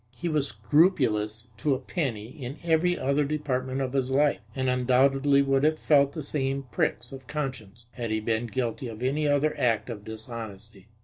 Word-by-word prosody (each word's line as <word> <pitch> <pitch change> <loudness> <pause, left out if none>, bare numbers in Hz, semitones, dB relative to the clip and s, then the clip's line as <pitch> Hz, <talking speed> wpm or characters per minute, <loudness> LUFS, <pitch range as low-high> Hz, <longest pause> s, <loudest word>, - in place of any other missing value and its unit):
He 175 - -3
was 150 -3 +2
scrupulous 110 - +1
to 140 +3 +1
a - - -4
penny 125 - -3
in 130 +1 -7
every 170 +2 +2
other 140 +2 +1
department 135 -3 -2
of 130 -1 -2
his 135 -2 0
life, 145 +2 +3 0.2
and 130 -1 -1
undoubtedly 135 +2 +3
would 135 0 +2
have 155 +1 +3
felt 140 -3 +3
the 155 - -5
same 135 -1 -2
pricks 120 +2 -1
of 135 -1 -10
conscience 125 -7 -5
had 120 -3 -5
he 110 0 0
been 110 +2 -1
guilty 125 +2 -2
of 115 +1 -7
any 145 +4 +1
other 145 +1 +2
act 120 0 +1
of 105 -3 -7
dishonesty. 110 -2 -8
130 Hz, 180 wpm, -27 LUFS, 115-145 Hz, 0.2 s, life